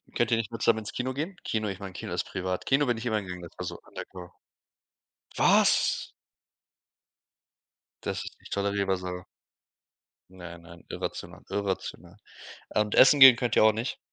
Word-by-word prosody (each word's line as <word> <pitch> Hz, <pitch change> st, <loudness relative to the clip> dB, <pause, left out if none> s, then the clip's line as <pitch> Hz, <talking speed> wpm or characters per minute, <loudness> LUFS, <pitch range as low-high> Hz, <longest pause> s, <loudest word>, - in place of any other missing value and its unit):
Könnt 120 Hz, -1 st, +1 dB
ihr 115 Hz, -, +4 dB
nicht 115 Hz, 0 st, -3 dB
mal 115 Hz, -, -6 dB
zusammen 115 Hz, -1 st, +3 dB
ins 105 Hz, -, -7 dB
Kino 130 Hz, +1 st, -3 dB
gehen? 165 Hz, +7 st, -5 dB
Kino 110 Hz, -1 st, -2 dB
ich 95 Hz, 0 st, -6 dB
meine 95 Hz, -2 st, -8 dB
Kino -, -, -6 dB
ist -, -, -2 dB
privat. 95 Hz, 0 st, -4 dB
Kino 140 Hz, +2 st, +3 dB
bin 120 Hz, -2 st, 0 dB
ich 115 Hz, -, -7 dB
immer 110 Hz, -3 st, 0 dB
gegangen, 90 Hz, -2 st, -8 dB
das 85 Hz, -, -12 dB
war -, -, -5 dB
so -, -, -6 dB
undercover. 90 Hz, -2 st, -10 dB, 1.0 s
Was? 205 Hz, +2 st, +3 dB, 1.9 s
Dass -, -, -2 dB
ist -, -, -10 dB
nicht -, -, -15 dB
tolerierbar 100 Hz, -1 st, 0 dB
so. 90 Hz, 0 st, -6 dB, 1.1 s
Nein, 90 Hz, -2 st, -11 dB
nein, 85 Hz, 0 st, -15 dB
irrational, -, -, -6 dB
irrational. 95 Hz, -2 st, -4 dB, 0.5 s
Und 105 Hz, -1 st, 0 dB
Essen 140 Hz, +2 st, +7 dB
gehen 130 Hz, -3 st, +11 dB
könnt 120 Hz, -1 st, -1 dB
ihr -, -, +5 dB
auch 110 Hz, -, +7 dB
nicht? 115 Hz, +4 st, -4 dB
105 Hz, 170 wpm, -27 LUFS, 90-120 Hz, 1.9 s, gehen